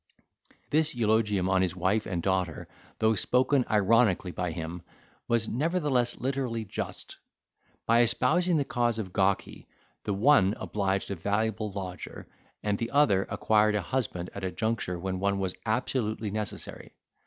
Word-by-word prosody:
This 155 -1 +2
eulogium 105 -4 +2
on 95 -1 +3
his 95 -1 0
wife 95 +4 0
and 85 -3 -2
daughter, 95 -4 -1 0.3
though 110 0 +3
spoken 130 +5 +2
ironically 105 -3 +3
by 90 0 -2
him, 85 +1 -5 0.5
was 115 -1 +1
nevertheless 145 -4 0
literally 125 -4 -2
just; - - -4 0.7
by 115 +1 +5
espousing 175 +8 +3
the 145 - +1
cause 120 -3 0
of 95 -5 -5
Gawky, 95 0 0 0.4
the 100 - -1
one 105 -3 +4
obliged 100 -1 -1
a - - -1
valuable 105 +3 -1
lodger, 95 -2 -7 0.4
and 105 -1 0
the 115 - -2
other 110 -10 +3
acquired 105 -1 +2
a 105 - +1
husband 90 -6 -2
at 100 - -7
a 95 - 0
juncture 110 -3 -2
when 95 +1 -3
one 100 +1 +1
was 95 -2 -2
absolutely 110 -2 -1
necessary. 105 -2 -5
105 Hz, 145 wpm, -28 LUFS, 95-120 Hz, 0.7 s, by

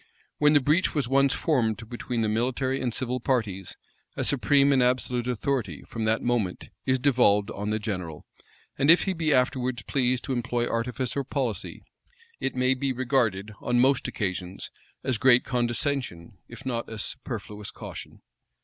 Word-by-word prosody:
When 150 0 +5
the 145 - +7
breach 155 +8 +2
was 140 -5 +1
once 135 +1 +3
formed 115 -9 0
between 120 0 -3
the 110 - +1
military 130 +4 0
and 125 -2 0
civil 125 +2 -2
powers, 110 -8 -2 0.4
a - - 0
supreme 140 +1 +4
and 130 - +4
absolute 125 -1 +1
authority, 120 - -2
from 115 -1 -4
that 110 +1 +1
moment, 115 -7 -1 0.2
is 130 0 +3
devolved 120 -7 +3
on 105 +1 -4
the 110 - +1
general; 90 -7 -5 0.5
and 140 - +3
if 170 - +7
he 190 - 0
be 160 -3 0
afterwards 125 -3 +1
pleased 125 0 0
to 135 - -2
employ 120 -1 -1
artifice 125 +1 -2
or 140 - 0
policy, 125 - -3 0.6
it 135 - -1
may 130 +1 +3
be 135 +1 -1
regarded, 120 -6 0
on 120 0 +1
most 135 +1 +3
occasions, 95 -2 -3 0.3
as 130 -4 0
great 125 0 +6
condescension, 120 - -2
if - - -12
not 120 -3 -2
as 110 -2 -3
superfluous 105 -1 -6
caution. - - -9
125 Hz, 165 wpm, -26 LUFS, 110-135 Hz, 0.6 s, the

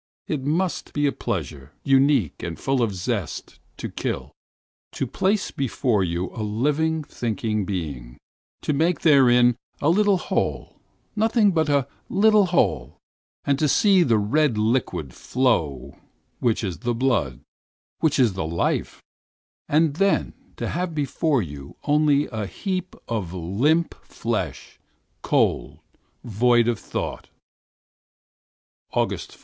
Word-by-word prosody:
It 150 -4 -2
must 170 +6 -1
be 145 0 +1
a 140 - +3
pleasure, 70 - -5
unique 135 - +3
and 85 -1 -5
full 135 -1 0
of 115 -3 +1
zest, 95 - -4 0.2
to - - -4
kill; - - -4 0.6
to - - -2
have - - -13
there 195 +3 +3 0.2
before 125 -4 0
one 90 -3 0 0.2
the 115 - -5
living, 150 +9 0
thinking 110 -5 -2
being; 70 -11 -5 0.5
to 150 - 0
make 160 +3 +1
therein 125 -5 +5 0.2
a 145 - +2
little 200 +2 +4
hole, - - -2 0.4
nothing 220 -1 +3
but 160 -3 +1
a 140 -2 +2 0.2
little 210 0 +4
hole, 85 - 0 0.5
to 140 +2 +2
see 195 - +4
that 120 -9 +3
red 130 +5 +2
thing 110 - 0
flow 75 - -1 0.4
which 120 -2 +1
is 90 -6 -3
the 120 +5 -1
blood, 115 - 0 0.6
which 160 - +2
makes 120 -8 +3
life; 85 -3 -2 0.7
and 155 0 +3 0.6
to - - -3
have 175 -2 -3
before 145 -2 0
one 70 -4 -9
only 150 -1 +3
a 110 -2 -4
heap 185 - -4
of 100 -7 -3
limp 125 - +1
flesh, - - -4 0.4
cold, - - +1 0.5
inert, 115 - -9
void 120 +2 +4
of 120 -2 0
thought! - - -5 1.6
5th - - -6
August. - - -2
125 Hz, 130 wpm, -23 LUFS, 100-155 Hz, 1.6 s, therein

